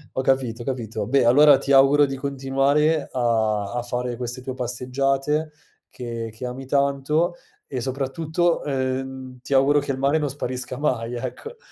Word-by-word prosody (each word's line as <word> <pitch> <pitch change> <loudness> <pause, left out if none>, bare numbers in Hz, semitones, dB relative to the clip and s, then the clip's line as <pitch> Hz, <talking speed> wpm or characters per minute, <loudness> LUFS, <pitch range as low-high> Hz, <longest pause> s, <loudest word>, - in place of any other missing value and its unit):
Ho 130 - +1
capito, 130 -3 0
capito. 115 -5 -3
Beh, 135 0 +3
allora 145 +3 +7
ti 140 +1 -3
auguro 140 +2 +6
di 135 -1 -4
continuare 140 +3 +1
a 110 -4 0
a 120 - -1
fare 125 0 -3
queste 125 +1 -5
tue 130 0 -5
passeggiate 135 +5 -1 0.4
che 115 -2 -6
che 120 +3 -7
ami 130 +2 -6
tanto, 140 +5 +1 0.3
e 130 -3 -4
soprattutto, 155 +6 -1
ehm, 130 -1 -3
ti 135 - -4
auguro 140 +2 +4
che 140 - -3
il 135 - -3
mare 140 +3 +2
non 150 -2 -1
sparisca 130 -2 -5
mai, 125 -5 -1
ecco. 455 - -6
135 Hz, 160 wpm, -23 LUFS, 125-140 Hz, 0.4 s, allora